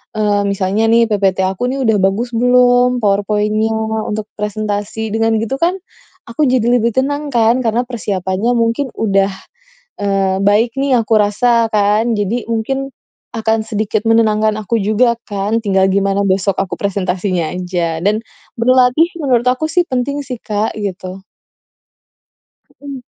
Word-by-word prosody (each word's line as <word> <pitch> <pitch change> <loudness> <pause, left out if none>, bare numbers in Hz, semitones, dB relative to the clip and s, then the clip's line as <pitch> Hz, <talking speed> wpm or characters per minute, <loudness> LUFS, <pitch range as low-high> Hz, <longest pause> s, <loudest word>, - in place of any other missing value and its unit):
eee, 205 -1 +1
misalnya 200 +2 0
nih, 230 0 +4
ppt 195 -2 +1
aku 195 +6 -2
nih 275 - -3
udah 220 - +3
bagus 225 +5 0
belum, 245 +1 +3
PowerPoint-nya 210 +2 +1 0.4
untuk 215 0 -4
presentasi. 210 +1 -3
Dengan 225 0 +1
begitu 225 +4 -2
kan, 355 +4 +1 0.5
aku 235 +6 -2
jadi 245 -2 +1
lebih 235 -1 +1
tenang 285 +2 -1
kan, 235 +1 +3
karena 230 +1 0
persiapannya 200 -2 -2
mungkin 230 +3 0
udah, 195 -2 +1 0.7
eee, 195 -1 0
baik 215 +3 +2
nih 270 -2 +2
aku 225 0 -1
rasa, 230 +3 +2
kan. 210 +3 +2
Jadi 215 +4 -2
mungkin 270 +5 -2 0.5
akan 220 0 0
sedikit 215 -1 -2
menenangkan 215 -1 +2
aku 225 +3 -1
juga 220 +4 +2 0.2
kan, 205 +3 -1
tinggal 195 -3 +2
gimana 195 0 +1
besok 195 0 0
aku 195 -3 -2
presentasinya 185 -3 -2
aja. 175 -3 -2
Dan 210 +2 +2 0.4
berlatih 255 +6 +3
menurut 250 -4 +1
aku 255 +5 0
sih 355 +1 +2
penting 280 +1 -2
sih, 250 -3 -5
Kak, 210 +1 -2
gitu. 190 -2 -5 1.6
Heeh. 280 -3 -8
220 Hz, 140 wpm, -16 LUFS, 200-245 Hz, 1.6 s, nih